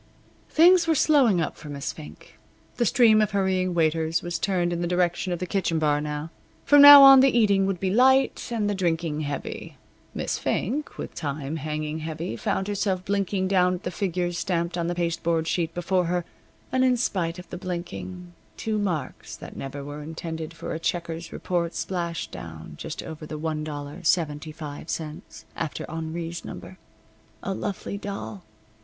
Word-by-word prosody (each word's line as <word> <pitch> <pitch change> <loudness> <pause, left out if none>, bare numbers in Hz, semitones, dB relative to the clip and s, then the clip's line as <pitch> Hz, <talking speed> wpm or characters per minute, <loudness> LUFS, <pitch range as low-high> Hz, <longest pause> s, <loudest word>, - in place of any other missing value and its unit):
Things 345 +1 +5
were 325 - +3
slowing 265 - +4
up 160 - -2
for 150 - -11
Miss 140 -1 -4
Fink. 75 +1 -13 0.4
The 240 - +2
stream 220 -2 +5
of 210 - +2
hurrying 185 -2 +1
waiters 160 0 +1
was 175 -1 -3
turned 180 -3 0
in 170 - -2
the 175 - 0
direction 180 +1 0
of 175 - -1
the 180 - -3
kitchen 180 -3 0
bar 150 -2 +2
now. 150 +1 -4 0.3
From 290 -1 +7
now 285 -1 +12
on 270 -1 +10
the 260 -2 +4
eating 200 -4 +3
would 195 -3 -2
be 190 0 -1
light, 265 +5 +3
and 220 -3 0
the 205 - 0
drinking 165 -4 -1
heavy. 145 -2 -5 0.4
Miss - - -2
Fink, 285 +9 -2
with - - -6
time 145 +1 -4
hanging 155 +1 -3
heavy, 160 -3 -4
found 190 - -2
herself 195 -3 -1
blinking 195 -1 0
down 180 -1 +3
at 180 - -9
the - - -3
figures 175 -2 -2
stamped 170 -2 -1
on 170 -1 -1
the 175 - -2
pasteboard 170 -1 0
sheet 165 -2 0
before 180 +1 +1
her, 175 0 -1 0.5
and 260 0 +2
in 255 -1 +3
spite 175 -7 -1
of 180 -1 -10
the 180 - -5
blinking, 95 - -6 0.2
two 215 -1 -1
marks 170 -10 -3
that - - -11
never 140 +1 -6
were 145 +1 -7
intended 160 +1 -6
for 165 - -6
a 160 - -4
checker's 170 0 -3
report 175 -2 -2
splashed 170 -3 -3
down 80 -2 -9
just 150 - -6
over 155 -1 -8
the 155 - -6
$1.75 155 0 -3
after 160 -3 -4
Henri's 165 +1 -5
number. 185 - -9 0.6
A 195 - -2
lovely 200 +1 -4
doll! 110 - -6
170 Hz, 170 wpm, -25 LUFS, 155-195 Hz, 0.6 s, now